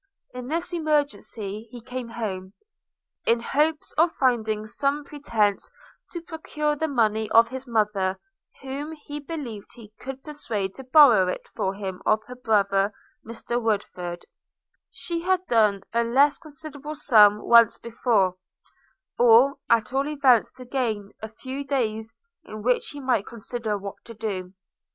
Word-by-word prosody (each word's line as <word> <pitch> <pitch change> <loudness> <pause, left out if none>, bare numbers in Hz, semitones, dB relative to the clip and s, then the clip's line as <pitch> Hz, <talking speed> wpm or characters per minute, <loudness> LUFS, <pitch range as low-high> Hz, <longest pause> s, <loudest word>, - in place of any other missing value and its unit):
In 250 0 -7
this 335 +5 -3
emergency 285 - -2
he 245 - -9
came 250 +1 -6
home, 195 -5 -5 0.7
in 230 +1 +3
hopes 300 +6 0
of 330 +1 +5
finding 220 -5 0
some 280 +7 -1
pretence 225 -9 -1 0.4
to 345 - -5
procure 300 -2 -2
the 320 +2 -1
money 220 -5 +1
of 230 0 +6
his 260 +1 -7
mother, 210 -4 0 0.5
whom 280 +4 -5
he 295 -1 -8
believed 280 -9 -7
he 215 -3 -14
could 265 0 -7
persuade 220 -10 -4
to 265 - -10
borrow 255 -8 +6
it 180 - -4
for 190 +1 -1
him 190 -2 -6
of 215 0 +2
her 250 - -9
brother 200 -4 +2 0.3
Mr 235 +1 -4
Woodford, 185 -5 -2
as - - -21 0.6
she 335 -1 -4
had 370 +1 +1
done 210 - +2
a 235 0 +2
less 275 +5 +3
considerable 300 0 -9
sum 210 -7 +6
once 235 0 +5
before; 220 -5 +1 0.8
or 245 +4 +6
at 230 +1 +2
all 275 +2 +1
events 275 -6 +3
to 255 -1 -11
gain 225 -6 -2
a 220 - -6
few 260 +5 -6
days, 225 -5 -2 0.3
in 215 -1 -9
which 250 +1 +2
he 290 - -7
might 255 -7 0
consider 230 -2 -4
what 200 0 -8
to 230 - -10
do. 195 -4 -5
235 Hz, 150 wpm, -25 LUFS, 210-280 Hz, 0.8 s, of